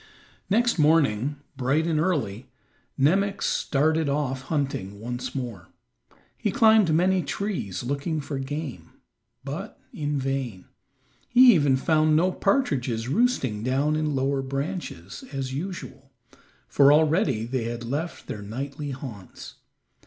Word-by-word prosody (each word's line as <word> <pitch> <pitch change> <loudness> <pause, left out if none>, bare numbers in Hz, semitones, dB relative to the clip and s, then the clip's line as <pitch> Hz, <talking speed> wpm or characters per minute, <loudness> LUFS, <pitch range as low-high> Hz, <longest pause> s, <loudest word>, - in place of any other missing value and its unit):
Next 235 -1 +2
morning, 145 -4 +3 0.2
bright 135 +5 +1
and 160 -2 +1
early, 135 - -1 0.5
Nemox 195 +8 +2
started 155 +2 +1
off 140 -2 -1
hunting 130 - -3
once 120 +4 -5
more. 115 -10 -5 0.7
He - - 0
climbed 220 -6 +5
many 180 +4 +3
trees 170 - -3
looking 140 +5 -2
for 140 -1 -4
game, 135 - -6 0.5
but 155 +10 -6
in 150 -7 -2
vain; 130 -8 -3 0.6
he 250 0 +8
even 145 -6 +3
found 155 +2 +3
no 180 +4 +3
partridges 130 - 0
roosting 140 - +1
down 135 +5 +1
in 155 -2 -1
lower 135 +1 0
branches, 135 - -5
as 135 -2 -4
usual, 140 -4 -6 0.6
for 140 0 +5
already 150 - +3
they 120 -1 -2
had 120 0 -4
left 145 +8 -4
their 105 - -6
nightly 135 +7 -5
haunts. 125 -8 -9
140 Hz, 125 wpm, -25 LUFS, 130-160 Hz, 0.7 s, he